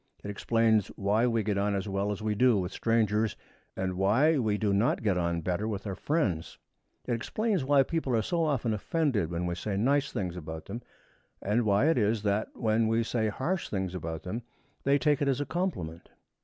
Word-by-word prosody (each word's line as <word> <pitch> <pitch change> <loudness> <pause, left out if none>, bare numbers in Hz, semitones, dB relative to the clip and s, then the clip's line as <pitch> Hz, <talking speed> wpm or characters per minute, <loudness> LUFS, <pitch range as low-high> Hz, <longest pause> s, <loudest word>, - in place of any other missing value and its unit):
It 105 - -4
explains 110 -1 +2
why 105 +4 +2
we 115 -2 +1
get 100 -1 0
on 100 0 +1
as 100 +1 -2
well 100 +1 -1
as 105 +1 -5
we 110 -1 +1
do 125 +1 +4
with 90 -1 -2
strangers, 110 -2 +1 0.4
and 95 0 -1
why 115 - +3
we 110 -4 +1
do 105 -2 +1
not 105 +4 +1
get 100 -4 +2
on 85 -1 0
better 90 +5 -1
with 105 -2 -4
our 100 - -3
friends. 95 - -1 0.5
It 125 - -1
explains 195 - -1
why 140 0 +4
people 135 -4 -1
are 110 - +2
so 170 +7 0
often 130 -7 0
offended 110 - 0
when 85 0 -2
we 85 - -1
say 95 +3 -3
nice 140 +6 +2
things 90 -3 -3
about 80 -2 -7
them, 115 +5 -6 0.6
and 110 +4 0
why 105 +7 +3
it 160 -6 +3
is 105 0 +1
that, 105 +1 +1
when 110 -1 +1
we 115 +1 +2
say 115 -1 0
harsh 170 - -2
things 95 -3 -2
about 80 -3 -5
them, 110 +6 -4 0.4
they 140 +1 +4
take 150 -1 +2
it 145 - +2
as 135 -1 +1
a 145 - -1
compliment. 115 - -3
110 Hz, 210 wpm, -29 LUFS, 100-130 Hz, 0.6 s, do